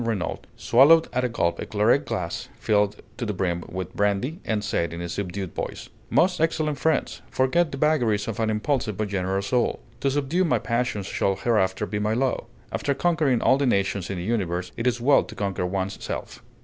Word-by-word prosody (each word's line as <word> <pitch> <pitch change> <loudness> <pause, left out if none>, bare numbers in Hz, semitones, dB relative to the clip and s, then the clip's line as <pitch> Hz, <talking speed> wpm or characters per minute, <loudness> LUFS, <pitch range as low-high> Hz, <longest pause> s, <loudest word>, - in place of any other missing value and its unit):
Renault, 110 -7 -2 0.2
swallowed 155 +7 +6
at 125 0 +1
a 125 - +1
gulp 85 -7 0
a - - -3
claret 110 +7 +2
glass 85 -2 -3
filled 105 -1 +2 0.2
to 120 - -4
the 105 -3 -2
brim 85 -2 -1
with 95 0 -5
brandy, 105 - 0
and 105 -2 -1
said, 85 -5 -1
in 85 - -6
a 85 - -4
subdued 95 0 -4
voice: - - -5 0.2
"Most 180 -2 +3
excellent 155 -3 0
friends, 160 -1 0
forget 150 +5 +2
the 135 - -5
vagaries 120 -9 +2
of 115 0 -4
an 110 -1 +1
impulsive 110 -1 -1
but 110 -1 -2
generous 95 0 -1
soul. 125 +3 +1 0.2
To 140 - +1
subdue 145 +6 +1
my 170 - +2
passions 115 -4 -1
shall 95 +1 0
hereafter 95 -3 +1
be 105 +3 -3
my 105 +1 0
law. 130 +1 0 0.3
After 140 - -1
conquering 155 -6 +2
all 135 - +4
the 140 - +2
nations 100 -4 0
in 95 - -3
the 85 - -4
universe, 90 -4 -1
it 115 +1 -1
is 120 -1 +1
well 135 +4 +4
to - - -11
conquer 95 -3 -2
one's 95 +1 -3
self." - - -5
110 Hz, 200 wpm, -25 LUFS, 95-135 Hz, 0.3 s, swallowed